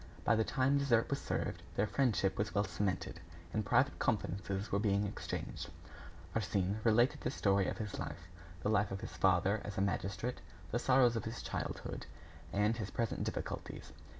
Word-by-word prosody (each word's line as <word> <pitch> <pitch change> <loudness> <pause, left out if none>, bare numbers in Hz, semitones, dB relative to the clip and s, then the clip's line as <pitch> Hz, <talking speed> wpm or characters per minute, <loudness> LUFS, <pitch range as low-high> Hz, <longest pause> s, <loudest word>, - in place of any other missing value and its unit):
By 115 - +4
the 110 - +3
time 135 +2 +2
dessert 120 -4 +3
was 140 - 0
served, - - -2
their 100 - +3
friendship 105 -6 +2
was 105 0 -2
well 100 - +4
cemented, 95 -2 -2 0.3
and 110 - +1
private - - +3
confidences 95 +2 -1
were 100 - +2
being 100 -1 +2
exchanged. 100 - -4 0.7
Arsène 105 -1 0
related 120 +2 +4
the - - 0
story 100 -6 +2
of - - -2
his 105 -4 -4
life, 85 0 -5 0.4
the - - +1
life 105 -1 +3
of 95 0 -4
his - - -6
father 95 +2 +3
as 105 - -6
a - - +2
magistrate, 100 +3 -1 0.3
the 120 - +1
sorrows 125 -1 +5
of 115 - -2
his 115 +2 -5
childhood, - - -4 0.4
and 105 +3 +2
his 105 -3 -3
present 115 -2 -1
difficulties. - - -4
105 Hz, 175 wpm, -35 LUFS, 100-115 Hz, 0.7 s, sorrows